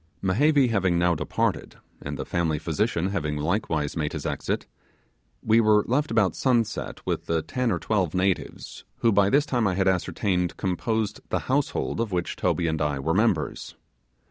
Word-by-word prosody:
Mehevi 135 Hz, +7 st, +3 dB
having 95 Hz, -5 st, +2 dB
now 85 Hz, 0 st, +3 dB
departed, 80 Hz, -, -2 dB, 0.3 s
and -, -, -5 dB
the -, -, -4 dB
family 85 Hz, -3 st, 0 dB
physician 85 Hz, +3 st, -1 dB
having 75 Hz, -6 st, -2 dB
likewise 80 Hz, -2 st, -1 dB
made 75 Hz, -3 st, -2 dB
his -, -, -5 dB
exit, -, -, -2 dB, 0.8 s
we 110 Hz, +1 st, +4 dB
were 105 Hz, -1 st, +4 dB
left 145 Hz, +5 st, +1 dB
about 110 Hz, -5 st, +2 dB
sunset 115 Hz, -4 st, -1 dB
with -, -, -3 dB, 0.2 s
ten 125 Hz, +7 st, -1 dB
or 90 Hz, -, +1 dB
twelve 95 Hz, -4 st, -1 dB
natives, 95 Hz, 0 st, -2 dB, 0.2 s
who 115 Hz, -, +4 dB
by 100 Hz, -1 st, +4 dB
this 145 Hz, +6 st, +3 dB
time 120 Hz, -7 st, +1 dB
I 95 Hz, -, 0 dB
had 95 Hz, 0 st, +1 dB
ascertained 90 Hz, -1 st, 0 dB
composed 105 Hz, +3 st, -1 dB
the -, -, 0 dB
household 135 Hz, -2 st, -1 dB
of 115 Hz, -3 st, -2 dB
which 90 Hz, -1 st, -2 dB
Toby 85 Hz, -, 0 dB
and 80 Hz, -1 st, -1 dB
I 75 Hz, -2 st, 0 dB
were 70 Hz, +5 st, -1 dB
members. 105 Hz, -5 st, 0 dB
95 Hz, 170 wpm, -25 LUFS, 85-115 Hz, 0.8 s, we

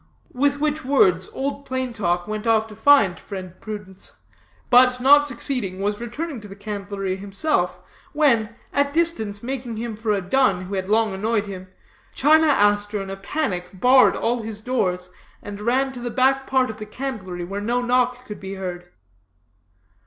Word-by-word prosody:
With 285 Hz, +2 st, +1 dB
which 305 Hz, +1 st, -1 dB
words 190 Hz, -9 st, +3 dB
Old 280 Hz, +1 st, -4 dB
Plain 260 Hz, -2 st, -3 dB
Talk 175 Hz, -5 st, -1 dB
went 215 Hz, +1 st, -4 dB
off 220 Hz, -1 st, +3 dB
to 220 Hz, -1 st, -12 dB
find 220 Hz, -6 st, +4 dB
friend 185 Hz, -3 st, -8 dB
Prudence, 205 Hz, -3 st, -8 dB, 0.6 s
but 250 Hz, 0 st, +6 dB
not 290 Hz, +3 st, +6 dB
succeeding, 235 Hz, -7 st, -2 dB
was 205 Hz, +2 st, -2 dB
returning 255 Hz, +2 st, -5 dB
to 210 Hz, -, -10 dB
the 195 Hz, -, -10 dB
candlery 200 Hz, -2 st, -4 dB
himself, 195 Hz, -, -1 dB, 0.3 s
when, 235 Hz, -8 st, +2 dB, 0.2 s
at 285 Hz, 0 st, +1 dB
distance 265 Hz, -12 st, 0 dB
mistaking 245 Hz, -3 st, -4 dB
him 230 Hz, -1 st, -4 dB
for 220 Hz, 0 st, -2 dB
a 205 Hz, -, +1 dB
dun 195 Hz, -1 st, +2 dB
who 185 Hz, +2 st, -7 dB
had 190 Hz, 0 st, -3 dB
long 220 Hz, -1 st, +2 dB
annoyed 215 Hz, +2 st, 0 dB
him, 185 Hz, -2 st, -8 dB, 0.5 s
China 315 Hz, +3 st, +5 dB
Aster 205 Hz, -5 st, +2 dB
in 195 Hz, 0 st, -5 dB
a -, -, -4 dB
panic 195 Hz, -, -3 dB
barred 255 Hz, +3 st, +6 dB
all 235 Hz, +1 st, 0 dB
his 220 Hz, -1 st, -6 dB
doors, 180 Hz, -7 st, -1 dB, 0.3 s
and 205 Hz, 0 st, -7 dB
ran 260 Hz, +4 st, +1 dB
to 255 Hz, -, -8 dB
the 240 Hz, 0 st, -4 dB
back 265 Hz, +3 st, +2 dB
part 260 Hz, -3 st, +2 dB
of 215 Hz, -, -12 dB
the 215 Hz, -, -8 dB
candlery, 210 Hz, -8 st, -5 dB
where 195 Hz, +3 st, -5 dB
no 240 Hz, +4 st, 0 dB
knock 250 Hz, 0 st, +1 dB
could 210 Hz, -, -8 dB
be 195 Hz, 0 st, -6 dB
heard. 175 Hz, -2 st, -6 dB
220 Hz, 175 wpm, -22 LUFS, 195-260 Hz, 0.6 s, but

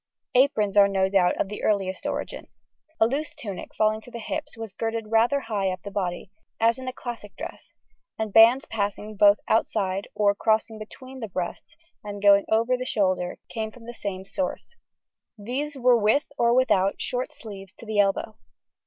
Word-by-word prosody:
Aprons 235 Hz, -6 st, +3 dB
are 200 Hz, -1 st, +8 dB
no 190 Hz, -1 st, +1 dB
doubt 190 Hz, -2 st, +2 dB
of -, -, +1 dB
the 210 Hz, +1 st, -7 dB
earliest 195 Hz, -3 st, 0 dB
origin. -, -, -4 dB, 0.5 s
A -, -, +6 dB
loose 280 Hz, +6 st, -2 dB
tunic 200 Hz, -5 st, -7 dB
falling 215 Hz, 0 st, +2 dB
to 245 Hz, -, -14 dB
the 235 Hz, -, -7 dB
hips 295 Hz, +4 st, -5 dB
was 225 Hz, -3 st, -7 dB
girded 225 Hz, -1 st, -3 dB
rather 235 Hz, +5 st, +3 dB
high 205 Hz, -5 st, -1 dB
up 185 Hz, 0 st, -4 dB
the 200 Hz, -, -8 dB
body, 185 Hz, -2 st, -3 dB, 0.3 s
as 230 Hz, +2 st, +3 dB
in 260 Hz, -, -7 dB
the 255 Hz, -, -2 dB
classic 240 Hz, -5 st, -8 dB
dress, -, -, -9 dB, 0.5 s
and 220 Hz, -2 st, -3 dB
bands 235 Hz, +6 st, +7 dB
passing 210 Hz, -1 st, -3 dB
both 205 Hz, 0 st, +6 dB
outside 200 Hz, -3 st, 0 dB
or 205 Hz, -1 st, +3 dB
crossing 220 Hz, +1 st, 0 dB
between 260 Hz, +5 st, -10 dB
the 225 Hz, -, -4 dB
breasts 180 Hz, -1 st, -5 dB, 0.3 s
and 205 Hz, -1 st, -6 dB
going 200 Hz, 0 st, +6 dB
over 230 Hz, +3 st, +3 dB
the 250 Hz, -, -4 dB
shoulder 185 Hz, -7 st, 0 dB
came 220 Hz, -2 st, -4 dB
from 230 Hz, +1 st, -15 dB
the 240 Hz, -, -7 dB
same 190 Hz, -4 st, -5 dB
source; 280 Hz, -, -4 dB, 0.6 s
these 270 Hz, +7 st, -4 dB
were 250 Hz, -2 st, +4 dB
with, 215 Hz, +7 st, +3 dB
or 235 Hz, -4 st, +3 dB
without, 200 Hz, -6 st, +3 dB
short 250 Hz, +4 st, -2 dB
sleeves 205 Hz, -10 st, -10 dB
to -, -, -13 dB
the 215 Hz, -1 st, -1 dB
elbow. 205 Hz, +2 st, +1 dB
220 Hz, 180 wpm, -25 LUFS, 200-240 Hz, 0.6 s, are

